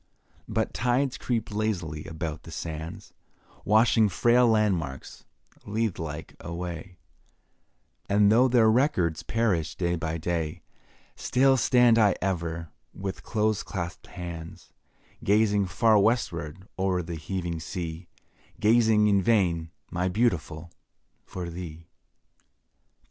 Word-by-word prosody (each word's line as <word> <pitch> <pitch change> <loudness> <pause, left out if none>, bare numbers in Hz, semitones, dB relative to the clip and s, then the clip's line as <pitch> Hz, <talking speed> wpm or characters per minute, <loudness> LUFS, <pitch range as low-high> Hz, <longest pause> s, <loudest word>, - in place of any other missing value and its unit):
But - - -1
tides 125 +3 +1
creep 115 -3 -2
lazily 90 -8 -2
about 80 -1 -5
the - - -12
sands, 80 0 -7 0.5
Washing 110 0 +4
frail 120 +6 +4
landmarks, 95 - -1 0.4
Lethe 110 -1 -2
like, 80 -1 -6
away, 85 +1 -6 1.1
And 100 0 +4
though 125 +4 +5
their 120 -3 +4
records 110 - +2
perish 100 -9 0
day 85 -1 0
by 80 0 -3
day, 80 -1 -3 0.5
Still 135 +1 +3
stand 125 -2 +4
I 105 -4 +4
ever, 85 -3 -3 0.3
with 95 0 -5
close 110 -2 0
claspèd 90 -4 -6
hands, 85 -2 -8 0.5
Gazing 105 -1 +3
far 110 +4 +4
westward 95 -5 -1
o'er 95 -2 +1
the 85 +1 -6
heaving 85 0 -4
sea, 85 +1 -6 0.5
Gazing 110 -1 +4
in 100 -2 +4
vain, 90 -7 +1 0.2
my 90 +1 0
Beautiful, 85 -6 -1 0.6
for 90 -2 -5
thee. 85 -2 -8
95 Hz, 110 wpm, -27 LUFS, 85-110 Hz, 1.1 s, though